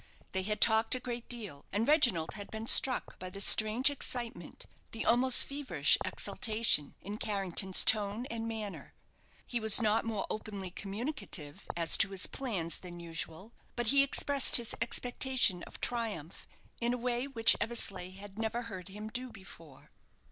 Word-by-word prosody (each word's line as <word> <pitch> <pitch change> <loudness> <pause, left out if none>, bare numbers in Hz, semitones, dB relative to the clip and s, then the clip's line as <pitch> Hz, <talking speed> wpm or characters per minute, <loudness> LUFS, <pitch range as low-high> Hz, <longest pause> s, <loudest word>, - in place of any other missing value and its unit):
They 190 - -2
had 210 +2 -4
talked 225 +1 +4
a - - -4
great 240 -1 -8
deal, 210 - -7
and 210 +4 -2
Reginald 240 - +2
had 205 -1 -10
been 220 0 -7
struck 255 +2 +3
by 185 - -8
the 195 +2 -10
strange 220 +7 +5
excitement 245 -3 -6 0.3
the 225 - -5
almost 245 +2 +6
feverish 280 0 +2
exultation 215 -10 +1
in 205 +3 -8
Carrington's 195 -2 0
tone 210 +3 +3
and 230 -1 -5
manner. 220 -3 -8 0.5
He 240 - -3
was 220 0 +4
not 220 0 0
more 220 -3 -4
openly 200 -4 -7
communicative 195 - -5
as 165 -1 +3
to - - +2
his 195 -2 -3
plans 190 - -4
than 175 -1 -11
usual, 165 +5 -7 0.2
but 240 -2 -1
he 280 - +5
expressed 280 0 +4
his 235 -1 +5
expectation 245 -4 +1
of - - -11
triumph 215 -10 -4 0.3
in 240 +1 -1
a - - -6
way 245 +2 -3
which 230 -5 +3
Eversleigh 195 -5 -3
had 205 +1 -12
never 225 +2 -3
heard 190 -6 -9
him 210 +2 -9
do 250 +3 -5
before. 160 -8 -15
220 Hz, 160 wpm, -30 LUFS, 190-240 Hz, 0.5 s, almost